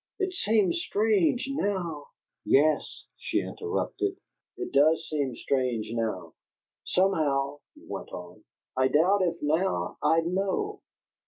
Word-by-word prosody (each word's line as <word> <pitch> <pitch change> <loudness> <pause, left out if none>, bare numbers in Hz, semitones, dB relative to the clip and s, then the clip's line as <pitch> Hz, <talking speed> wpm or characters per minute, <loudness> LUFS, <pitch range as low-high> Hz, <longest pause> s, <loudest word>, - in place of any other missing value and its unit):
It 380 -2 -1
seems 210 - +2
strange 215 +4 +2
now 185 - -2 0.2
" - - -61
"Yes," 155 +3 +2
she - - 0
interrupted. 410 -2 -2 0.4
"It 375 -1 -5
does 155 +3 +4
seem 140 -5 -1
strange 125 -5 -1
now!" 110 -8 -3 0.5
"Somehow," 145 -7 +1 0.2
he - - -17
went - - -6
on, 90 0 -9 0.3
"I 130 0 +3
doubt 175 +9 +3
if 175 -2 +1
now 150 - 0
I'd 165 0 +3
know." 195 - -1
165 Hz, 120 wpm, -28 LUFS, 135-200 Hz, 0.5 s, does